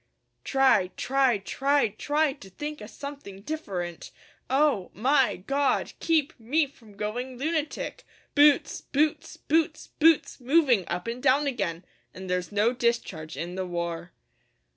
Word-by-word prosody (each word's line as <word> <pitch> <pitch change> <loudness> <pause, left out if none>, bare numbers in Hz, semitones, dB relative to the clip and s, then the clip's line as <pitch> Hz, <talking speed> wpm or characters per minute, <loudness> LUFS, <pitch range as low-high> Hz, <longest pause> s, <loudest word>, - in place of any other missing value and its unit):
Try 265 -8 +3
try 265 -3 +2
try 275 +6 +1
try 290 +7 0
to 230 -9 -14
think 295 +9 -6
o' - - -7
something 280 -9 -9
different 190 - -5 0.4
Oh 270 -8 +2
my 265 +4 +3
God 275 +9 0
keep 315 -3 +1
me 290 +8 +2
from 225 -7 -18
going 245 +5 -4
lunatic! 315 - -3 0.3
Boots 290 0 +4
boots 295 +2 -1
boots 310 0 0
boots 320 -2 +2
moving 255 - +3
up 180 - -3
and 235 +2 -4
down 275 +4 +3
again 190 -10 -2 0.3
An' 190 - -8
there's 180 0 -2
no 210 +4 +2
discharge 235 -10 -2
in 175 +1 -4
the 185 0 -3
war. 170 0 -4
255 Hz, 135 wpm, -27 LUFS, 195-290 Hz, 0.4 s, Boots